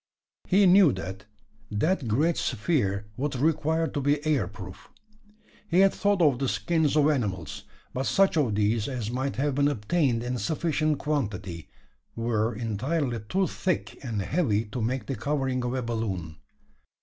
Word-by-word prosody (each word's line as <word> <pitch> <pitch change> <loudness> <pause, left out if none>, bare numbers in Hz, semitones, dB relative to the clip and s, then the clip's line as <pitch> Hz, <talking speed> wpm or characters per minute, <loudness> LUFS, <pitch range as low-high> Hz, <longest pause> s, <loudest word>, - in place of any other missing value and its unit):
He 200 +2 +5
knew 185 -3 +7
that 95 +1 -6 0.4
that 130 - 0
great 150 +10 +2
sphere 105 - 0
would 140 +1 -2
require 160 +3 +1
to 145 -2 -3
be 145 +2 +1
air 140 - +2
proof. 95 -3 -10 0.8
He 180 -1 +4
had 195 0 +5
thought 200 -2 +2
of 140 -5 +3
the 135 -2 0
skins 160 -4 +1
of 150 -1 +5
animals; 100 - -2 0.3
but 130 +1 -2
such 195 -2 +3
of 130 -10 +1
these 105 +1 +1
as 120 -5 -3
might 130 +2 -2
have 145 +1 0
been 140 +2 +2
obtained 125 -1 0
in 125 0 -2
sufficient 155 -1 0
quantity, 105 - -3 0.5
were 115 -1 0
entirely 120 +4 -1
too 190 +1 +2
thick 185 -5 -3
and 110 -6 -2
heavy 115 - +1
to 105 +3 -5
make 125 +4 -1
the 135 - -3
covering 130 +1 -1
of 125 +1 -2
a 130 - -2
balloon. 100 -9 -3
130 Hz, 160 wpm, -27 LUFS, 110-155 Hz, 0.8 s, knew